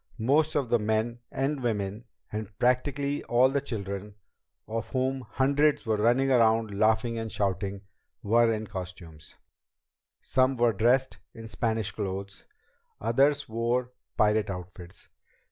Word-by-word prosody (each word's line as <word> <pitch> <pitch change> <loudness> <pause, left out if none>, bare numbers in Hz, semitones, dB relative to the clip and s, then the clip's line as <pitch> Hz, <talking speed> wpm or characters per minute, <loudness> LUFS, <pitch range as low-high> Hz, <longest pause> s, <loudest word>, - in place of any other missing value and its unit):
Most 145 +7 +2
of 140 -5 0
the 120 - +3
men 110 +2 -1
and 135 +1 -1
women, 105 -1 -2 0.3
and 105 -1 -6
practically 140 +3 0
all 125 +2 +4
the 140 +1 0
children 100 -5 -5 0.5
of 115 +1 -4
whom 130 0 -1
hundreds 140 +5 +1
were 110 -1 +1
running 120 +5 +3
around 115 -3 +3
laughing 110 +2 +2
and 110 -1 -5
shouting 100 0 -2 0.4
were 115 +2 +4
in 110 0 -2
costume. 90 -5 -8 1.0
Some 130 0 +1
were 120 -1 +3
dressed 120 +4 +2 0.2
in 115 0 -9
Spanish 110 -2 -1
clothes, 100 -1 -5 0.5
others 140 +6 +2
wore 120 +3 -1 0.3
pirate 105 0 +2
outfits. 90 -1 -9
115 Hz, 130 wpm, -28 LUFS, 105-130 Hz, 1.0 s, all